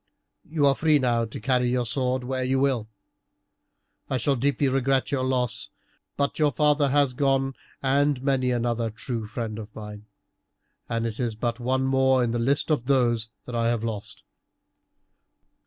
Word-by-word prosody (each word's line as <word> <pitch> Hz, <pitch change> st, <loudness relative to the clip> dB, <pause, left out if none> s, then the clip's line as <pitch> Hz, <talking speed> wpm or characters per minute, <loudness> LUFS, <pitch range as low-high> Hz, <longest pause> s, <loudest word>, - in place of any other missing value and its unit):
You 150 Hz, -2 st, +1 dB
are 140 Hz, -, +5 dB
free 155 Hz, +1 st, +3 dB
now 120 Hz, -4 st, +1 dB
to 110 Hz, -, -8 dB
carry 125 Hz, +1 st, +1 dB
your 125 Hz, 0 st, 0 dB
sword 130 Hz, +1 st, -1 dB
where 130 Hz, +1 st, -2 dB
you 130 Hz, +1 st, +1 dB
will. 130 Hz, -6 st, +1 dB, 1.2 s
I 130 Hz, -, 0 dB
shall 135 Hz, +3 st, +1 dB
deeply 140 Hz, +2 st, +1 dB
regret 135 Hz, 0 st, +1 dB
your 135 Hz, -2 st, 0 dB
loss, 125 Hz, -6 st, -1 dB, 0.5 s
but 140 Hz, +2 st, -1 dB
your 150 Hz, -1 st, +4 dB
father 145 Hz, +1 st, +2 dB
has 140 Hz, -1 st, +3 dB
gone 135 Hz, 0 st, +1 dB, 0.3 s
and 140 Hz, 0 st, +2 dB
many 135 Hz, -2 st, +1 dB
another 120 Hz, -1 st, 0 dB
true 115 Hz, 0 st, -5 dB
friend 110 Hz, -1 st, -4 dB
of 105 Hz, 0 st, -10 dB
mine, 105 Hz, -1 st, -9 dB, 0.8 s
and 115 Hz, 0 st, -1 dB
it 115 Hz, -2 st, -4 dB
is 120 Hz, -3 st, -1 dB
but 120 Hz, +2 st, -2 dB
one 130 Hz, +2 st, 0 dB
more 130 Hz, -1 st, +3 dB
in 120 Hz, -, 0 dB
the 120 Hz, -, -1 dB
list 140 Hz, +6 st, +1 dB
of 140 Hz, -5 st, +1 dB
those 120 Hz, -5 st, +2 dB, 0.2 s
I 115 Hz, -2 st, 0 dB
have 115 Hz, -1 st, 0 dB
lost. 110 Hz, -3 st, -5 dB
125 Hz, 165 wpm, -25 LUFS, 115-135 Hz, 1.2 s, are